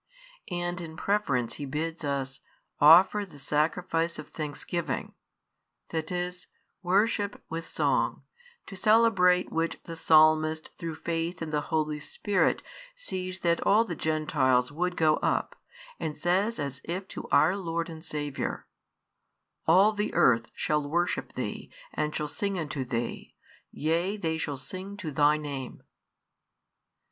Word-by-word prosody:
And 175 0 -2
in 160 -1 -8
preference 140 - 0
He 145 - -4
bids 160 +4 -3
us 135 -2 -2 0.4
offer 180 +7 +7
the 180 -7 -12
sacrifice 165 +3 0
of - - -8
thanksgiving, 155 +2 -4 0.8
that 160 0 -3
is, 180 0 -3 0.3
worship 205 +2 +1
with 165 +1 -5
song, - - 0 0.4
to 195 - -9
celebrate 190 -3 +4
which 165 +1 -1
the 165 - -7
Psalmist 155 0 +4
through 165 -2 -5
faith 165 +1 -3
in 165 -2 -5
the 150 -1 +1
Holy 155 -2 0
Spirit 190 +6 0 0.3
sees 185 - -5
that 170 -1 +2
all 220 +3 +4
the 175 - -4
Gentiles 145 -5 +1
would 180 +4 -2
go 155 -1 +4
up, - - 0 0.4
and 155 -1 -3
says 190 +8 +1
as 140 -2 -4
if 185 +3 -4
to - - -7
our 170 +5 +4
Lord 170 -3 -2
and 160 -1 -9
Saviour: 145 -4 -4 1.0
All 190 +6 +6
the 210 0 -2
earth 115 -2 +4
shall 150 0 +1
worship 175 +3 -1
Thee, - - -5 0.2
and 150 0 -1
shall 150 - -1
sing 200 +5 -2
unto 145 -5 -3
Thee; 120 -2 -4 0.3
yea 170 +6 0
they 160 -4 -2
shall 145 -3 -3
sing 190 +9 -7
to 165 -6 -5
Thy 145 +2 +4
name. 140 -4 -6
165 Hz, 135 wpm, -28 LUFS, 150-180 Hz, 1.0 s, offer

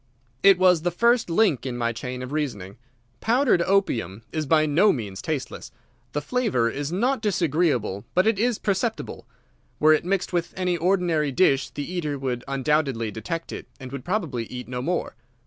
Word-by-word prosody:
"It 195 -2 +7
was 180 -3 +4
the 175 - +1
first 235 +4 +2
link 170 - +2
in 125 -2 -4
my 115 -1 0
chain 125 +2 -5
of 125 - -7
reasoning. 120 -11 -3 0.4
Powdered 240 -5 +3
opium 115 - 0
is 155 -2 -2
by 155 +1 +4
no 170 +8 +4
means 100 -7 -5
tasteless. 155 -4 -4 0.4
The 150 - -2
flavour 200 - +1
is 145 +2 -4
not 245 +7 0
disagreeable, 155 - 0
but 185 - +4
it 220 -2 +2
is 240 0 +1
perceptible. 215 +3 -2 0.5
Were 155 +1 +6
it 155 - +1
mixed 190 +1 -1
with 170 -1 -1
any 180 -1 0
ordinary 170 -4 +1
dish 135 -3 +3
the 145 - -5
eater 160 -5 -3
would 125 -3 -3
undoubtedly 135 -4 0
detect 165 - -5
it, - - -7
and 130 -2 -9
would 140 -2 -6
probably 165 - -2
eat 125 +2 -8
no 125 0 -4
more. 175 +6 -2
155 Hz, 175 wpm, -24 LUFS, 125-185 Hz, 0.5 s, It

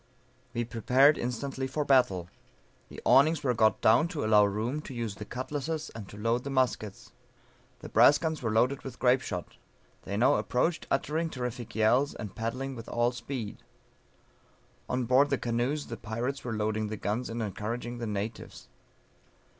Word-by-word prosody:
We 120 0 0
prepared 125 +6 +4
instantly 130 +2 -3
for 145 +3 -2
battle; 100 -11 +3 0.6
the - - -9
awnings 155 +3 +5
were 125 -3 +2
got 110 -1 +2
down 120 +9 +5
to 155 -9 -3
allow 105 -1 +6
room 110 +9 -2
to 135 - -9
use 115 -3 -3
the 105 +1 -8
cutlasses 145 +6 -4
and 110 -4 -8
to 105 - -11
load 115 +3 0
the 140 - -5
muskets. 125 -6 -1 0.7
The - - -8
brass 145 - +6
guns 160 -1 -3
were 115 - -1
loaded 125 +5 +2
with 130 -2 -8
grape 130 +1 +3
shot. 90 - -6 0.4
They 100 - -4
now 130 +6 +4
approached 160 +7 0
uttering 155 +4 0
terrific 125 -5 -5
yells, 120 +6 +3
and 105 -3 -7
paddling 130 +4 -4
with 115 -1 -9
all 120 +1 +1
speed. 125 -3 -5 1.3
On 125 0 0
board 130 +4 +4
the 140 - +1
canoes 125 +6 -1
the 115 - -7
pirates 120 +6 -4
were 115 -3 -3
loading 110 0 -1
the 110 0 -5
guns 110 +5 -2
and 115 +1 -4
encouraging 115 +3 -4
the 115 - -3
natives. 105 +2 -5
120 Hz, 170 wpm, -29 LUFS, 110-135 Hz, 1.3 s, allow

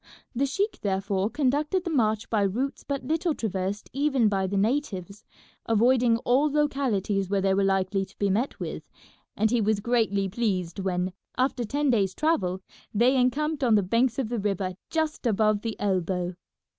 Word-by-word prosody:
The 270 +3 +1
sheik 405 +10 -1
therefore 195 0 0
conducted 295 +7 0
the 345 - -3
march 220 -6 +1
by 215 -2 +2
routes 235 +8 -1
but 280 -1 -3
little 325 0 0
traversed 200 -1 -3
even 270 -5 +2
by 195 -2 0
the 200 +1 -2
natives, 205 -4 -1 0.4
avoiding 235 +1 +4
all 275 +5 +3
localities 245 -10 0
where 200 0 +1
they 195 0 +2
were 195 +1 +2
likely 195 0 +1
to 190 - -23
be 200 -1 +1
met 230 +8 -1
with, - - -6 0.5
and 220 +1 +2
he 240 -2 +2
was 215 0 +1
greatly 215 -3 +1
pleased 190 -4 -2
when, 185 -1 -1 0.2
after 255 -1 +1
ten 285 +5 0
days' 195 -5 +1
travel, 190 - 0 0.3
they 240 +5 +3
encamped 285 +4 +1
on 235 -4 +4
the 205 - +3
banks 230 +5 +1
of 260 -5 -1
the 240 -1 -2
river 195 -2 -1 0.2
just 315 -5 -1
above 215 -1 +2
the 225 -1 -4
elbow. 185 -2 -1
220 Hz, 170 wpm, -26 LUFS, 195-265 Hz, 0.5 s, avoiding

